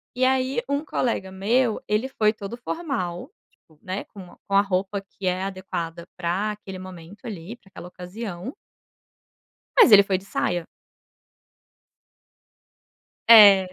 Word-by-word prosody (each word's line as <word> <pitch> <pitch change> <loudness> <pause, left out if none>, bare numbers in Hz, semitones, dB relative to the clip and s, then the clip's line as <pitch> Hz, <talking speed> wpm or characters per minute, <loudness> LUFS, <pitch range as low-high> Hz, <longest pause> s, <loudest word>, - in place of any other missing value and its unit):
e 255 - 0
aí 260 -1 +1
um 285 +2 -1
colega 210 -9 -2
meu 220 +4 +1
ele 215 +5 0
foi 215 -5 +1
todo 215 0 -7
formal, 245 - -4 0.2
tipo, 155 -4 -28
né, 185 +1 -4
com 200 - -12
uma 180 - -14
com 195 - -1
a 200 - +7
roupa 195 0 -2
que 195 -1 -7
é 185 +1 0
adequada 175 -3 -5
pra 185 +4 -1
aquele 195 -3 -9
momento 185 +1 -12
ali 205 0 -7
pra 195 - -23
aquela 175 - -10
ocasião 180 +4 -7 1.3
mas 460 - +8
ele 200 -1 +10
foi 195 -1 0
de 190 - -15
saia. 175 -3 -2 2.6
É. 200 -5 +8
195 Hz, 140 wpm, -24 LUFS, 185-230 Hz, 2.6 s, ele